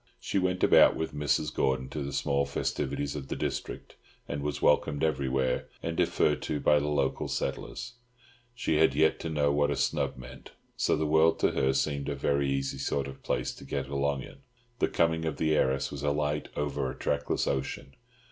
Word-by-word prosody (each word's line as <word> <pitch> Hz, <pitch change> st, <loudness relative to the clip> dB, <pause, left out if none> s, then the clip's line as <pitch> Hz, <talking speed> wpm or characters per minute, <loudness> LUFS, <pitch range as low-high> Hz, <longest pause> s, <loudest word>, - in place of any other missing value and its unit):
She 100 Hz, -, -1 dB
went 90 Hz, 0 st, 0 dB
about -, -, +7 dB
with 80 Hz, -, -3 dB
Mrs. 75 Hz, 0 st, 0 dB
Gordon 65 Hz, -1 st, 0 dB
to 75 Hz, -, -4 dB
the 70 Hz, 0 st, -4 dB
small 70 Hz, 0 st, +1 dB
festivities 70 Hz, 0 st, -2 dB
of 70 Hz, -2 st, -5 dB
the -, -, -3 dB
district, -, -, -4 dB, 0.3 s
and 70 Hz, 0 st, -3 dB
was 75 Hz, 0 st, -2 dB
welcomed 75 Hz, -1 st, +2 dB
everywhere, 65 Hz, -4 st, 0 dB, 0.2 s
and 85 Hz, 0 st, -2 dB
deferred -, -, +2 dB
to 75 Hz, -, -2 dB
by 75 Hz, 0 st, +4 dB
the 75 Hz, -, -2 dB
local 75 Hz, -2 st, 0 dB
settlers; 120 Hz, -, -4 dB, 0.6 s
she 80 Hz, -, 0 dB
had 75 Hz, -4 st, +4 dB
yet 80 Hz, +2 st, +3 dB
to 80 Hz, -, -4 dB
know 75 Hz, -2 st, +2 dB
what 75 Hz, 0 st, +2 dB
a 70 Hz, -, 0 dB
snub -, -, 0 dB
meant; 65 Hz, +1 st, -11 dB, 0.2 s
so -, -, +2 dB
the 80 Hz, -, -1 dB
world 80 Hz, +2 st, +4 dB
to -, -, +3 dB
her 65 Hz, -, +2 dB
seemed 70 Hz, +1 st, -1 dB
a 70 Hz, -, -2 dB
very 70 Hz, 0 st, +1 dB
easy 70 Hz, 0 st, -2 dB
sort 70 Hz, 0 st, -1 dB
of 65 Hz, -1 st, -10 dB
place -, -, -1 dB
to -, -, -12 dB
get 70 Hz, 0 st, -4 dB
along 70 Hz, -1 st, -1 dB
in. -, -, -12 dB, 0.4 s
The -, -, +3 dB
coming 80 Hz, 0 st, +1 dB
of 80 Hz, -3 st, -2 dB
the 80 Hz, -1 st, +2 dB
heiress 65 Hz, -2 st, +1 dB
was 70 Hz, -1 st, -6 dB
as 70 Hz, 0 st, +1 dB
light 75 Hz, 0 st, -1 dB
over 75 Hz, -3 st, -1 dB
a -, -, -7 dB
trackless 70 Hz, 0 st, -1 dB
ocean. 70 Hz, 0 st, -3 dB
70 Hz, 200 wpm, -29 LUFS, 70-75 Hz, 0.6 s, about